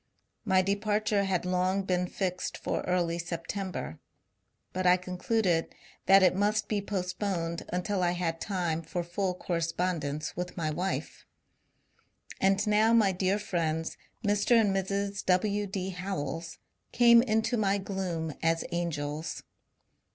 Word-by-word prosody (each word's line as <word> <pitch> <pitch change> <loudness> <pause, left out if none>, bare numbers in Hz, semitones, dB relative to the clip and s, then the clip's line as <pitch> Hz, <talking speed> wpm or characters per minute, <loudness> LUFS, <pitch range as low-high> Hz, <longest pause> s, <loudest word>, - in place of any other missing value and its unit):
My 190 -3 +4
departure 205 +1 +1
had 185 -2 0
long 185 +2 +1
been 180 -1 0
fixed 185 -1 -3
for - - -2
early 175 -2 +1
September, 175 - -4 0.7
but 185 0 0
I 180 0 +6
concluded 180 -1 0 0.3
that 195 0 +7
it 180 -1 +5
must 210 +2 +1
be 210 -2 0
postponed 180 -3 -3
until 185 +2 -1
I 175 -1 +2
had 165 -2 -2
time 175 -5 -1
for 175 +2 -3
full 180 +2 -2
correspondence 165 -4 -2
with 180 +1 -5
my 155 -2 -1
wife. 180 +5 -3 1.1
ALud 195 0 +3
now 215 +2 +4
my 215 -4 +5
dear 190 +2 +1
friends, 165 -5 -2 0.3
Mr. 205 +3 +4
and 205 -3 +2
Mrs. 200 +1 -1
W. 200 +3 +2
D. 190 -1 -3
Howells, 165 -4 -4 0.3
came 235 -1 +7
into 225 0 +1
my 200 -3 +2
gloom 185 -5 -3
as 165 0 +1
angels. 155 -2 -3
185 Hz, 130 wpm, -29 LUFS, 170-200 Hz, 1.1 s, that